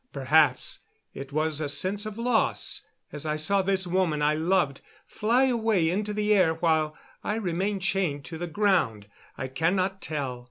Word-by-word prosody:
Perhaps 140 -1 +2 0.3
it 135 +1 -8
was 155 +1 0
a 145 - -1
sense 190 +9 +1
of 215 0 -7
loss 235 -1 +1 0.3
as 150 0 -5
I 155 -1 -1
saw 175 +6 +1
this 190 0 +1
woman 175 -4 0
I 150 +1 +3
loved 160 -3 0 0.2
fly 235 +5 +1
away 220 -10 +2
into 210 +3 -2
the 210 0 +1
air 180 -5 +3
while 160 -2 0 0.3
I 210 - -1
remained 195 -1 -2
chained 175 -8 -1
to 165 -2 -7
the 175 - -3
ground. 165 - +1 0.3
I 130 - -4
cannot 185 +7 0
tell. 135 -5 -3
175 Hz, 165 wpm, -26 LUFS, 150-200 Hz, 0.3 s, I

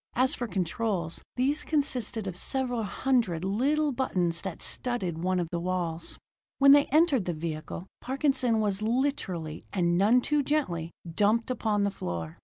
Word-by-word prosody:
As 255 +2 +3
for 245 - -3
controls, 185 -2 -1
these 275 +4 +1
consisted 255 -8 -1
of 190 -3 -4
several 245 +4 -1
hundred 215 -6 0
little 285 +9 +1
buttons 180 -10 0
that 190 -4 -5
studded 190 -10 -2
one 185 +1 0
of 175 - -1
the 170 - -1
walls. 170 -2 -2 0.4
When 275 0 +7
they 285 0 +7
entered 295 - +3
the 175 - -1
vehicle, 160 +2 -5 0.2
Parkinson 265 -4 +1
was 205 -2 0
literally, 215 - -1
and 175 -2 +1
none 220 +6 +5
too 295 +3 +1
gently, 260 - -1 0.2
dumped 215 +6 +2
upon 215 -4 0
the 200 - +1
floor. 85 - -5
210 Hz, 155 wpm, -28 LUFS, 175-260 Hz, 0.4 s, When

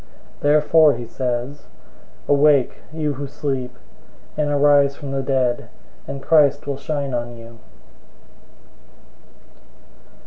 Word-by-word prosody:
005:014 - - -28
Therefore 150 +1 +4
he 120 0 -7
says, 125 +3 -4 0.6
"Awake, 145 -2 +3
you 155 -2 -2
who 140 +1 -6
sleep, 130 -3 -4 0.6
and 150 -1 -1
arise 145 -1 +3
from 140 -1 -8
the 135 0 -1
dead, 130 -3 -1 0.4
and 135 -1 -6
Christ 145 -3 +3
will 140 -1 -3
shine 140 -2 -4
on 120 0 -4
you." 115 0 -13
140 Hz, 110 wpm, -21 LUFS, 125-145 Hz, 0.6 s, Therefore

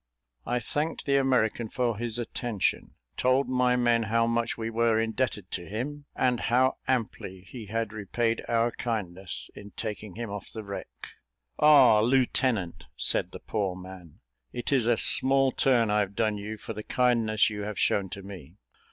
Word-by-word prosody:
I 125 - 0
thanked 150 +7 -3
the 140 -1 +3
American 120 -4 +1
for 120 -2 0
his 115 +1 -2
attention 120 -3 -2 0.2
told 130 +2 +2
my 125 -1 +2
men 120 -1 +3
how 115 +1 +1
much 115 0 -1
we 115 0 -3
were 115 -1 +2
indebted 110 -4 -2
to 90 -2 -5
him, 140 +7 -5
and 125 -2 +1
how 130 +2 +2
amply 110 -7 -2
he 105 +4 -10
had 115 0 -2
repaid 115 +2 -1
our 115 0 +2
kindness 95 -7 -4
in 100 0 -12
taking 105 -3 -5
him 115 -2 -5
off 105 -1 -7
the 110 - -7
wreck. 100 -1 -6 0.7
"Ah, 140 -7 +7
lieutenant," 120 -5 +1
said - - +2
the - - -10
poor 100 -4 -2
man, 90 -3 -12 0.3
"it 120 +2 -4
is 130 -5 +2
a 120 -1 +3
small 135 +3 +4
turn 120 -6 +2
I've 105 -1 0
done 110 -2 +1
you 105 +2 -6
for 110 - -7
the 105 - -6
kindness 115 -3 +2
you 105 -1 -5
have 105 0 -5
shown 100 -2 +1
to 100 +2 -8
me." 90 -5 -11
115 Hz, 170 wpm, -27 LUFS, 105-125 Hz, 0.7 s, Ah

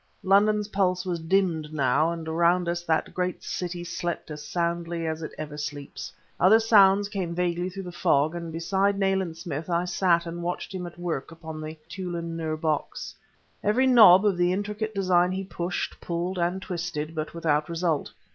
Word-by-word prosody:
London's 210 +2 +3
pulse 185 -2 +1
was 175 -2 -2
dimmed 165 -3 0
now, 155 +2 +2
and 165 -1 -6
around 170 +2 +3
about 170 - -1
us 175 0 -3
that 160 -1 0
great 180 0 -2
city 175 -1 -4
slept 170 -1 -4
as 150 0 -6
soundly 170 +1 -2
as 160 0 -3
it 155 - -5
ever 150 -1 -6
sleeps. 145 -1 -6 0.3
Other 200 +6 +6
sounds 205 -3 +5
came 190 -5 -3
vaguely 175 0 0
through 195 +1 -7
the 180 - -7
fog, 150 -2 +2
and 170 -1 -5
beside 190 +5 +1
Nayland 190 -4 0
Smith 165 -1 -5
I 170 +1 +1
sat 175 -2 +2
and 170 +1 -5
watched 175 +3 -4
him 180 -2 -4
at 175 - -12
work 170 -4 -3
upon 160 -1 -8
the 155 +1 -7
Tûlun 170 -3 -5
Nûr 160 -1 -3
box. 155 -2 -2 0.5
Every 225 +6 +3
knob 215 -7 +8
of 200 -4 +2
the 175 0 +3
intricate 210 +3 -3
design 180 -2 +3
he 190 +1 -3
pushed, 175 -1 -4
pulled 175 +2 -3
and 180 +3 -1
twisted; 170 -4 -4
but 155 +1 -4
without 155 -1 0
result. 165 -2 -1
175 Hz, 185 wpm, -26 LUFS, 165-190 Hz, 0.5 s, knob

